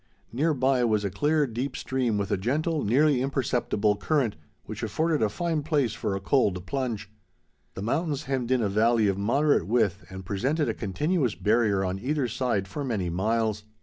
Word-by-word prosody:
Near 150 +5 +1
by 130 -1 +2
was 110 -3 +1
a 100 - -2
clear 150 - +2
deep 125 +2 -4
stream 125 -5 -1
with 100 -1 -2
a - - +3
gentle, 150 - -1
nearly 135 +4 +3
imperceptible 120 -6 0
current, 130 -1 0 0.3
which - - -7
afforded 155 +8 0
a 110 - +3
fine 165 - -1
place 145 -6 0
for 100 - -2
a - - -2
cold 95 -4 +1
plunge. 130 -8 -3 0.7
The 95 - -5
mountains 145 +4 -1
hemmed 130 -4 -2
in 130 -2 +2
a - - +2
valley 110 +2 +3
of 100 0 0
moderate 135 - +2
width 105 -4 +1
and 95 0 -8
presented 135 - 0
a - - 0
continuous 125 - -1
barrier 105 -3 +2
on 95 +1 -2
either 135 +3 -1
side 120 -5 -1
for 120 +10 -5
many 105 -10 -2
miles. 110 +3 0
120 Hz, 180 wpm, -26 LUFS, 105-140 Hz, 0.7 s, a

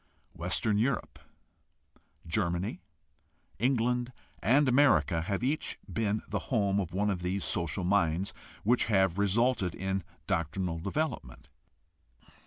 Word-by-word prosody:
Western 100 +5 0
Europe, 125 +3 -1 1.1
Germany, 85 +2 -1 0.8
England, 125 0 +1 0.3
and 135 +5 +4
America 100 - +4
have 100 +5 -2
each 145 +5 0
been 110 -1 -1
the - - -2
home 100 -5 +2
of 90 -4 -3
one 100 +3 +1
of 90 -2 -3
these 90 +2 -1
social 85 +1 -1
minds 90 -1 +1 0.3
which 120 +4 +3
have 95 -3 +2
resulted 100 -1 +2
in 95 0 -2 0.2
doctrinal 85 +1 -1
development. 100 - -3
100 Hz, 110 wpm, -30 LUFS, 90-115 Hz, 1.1 s, and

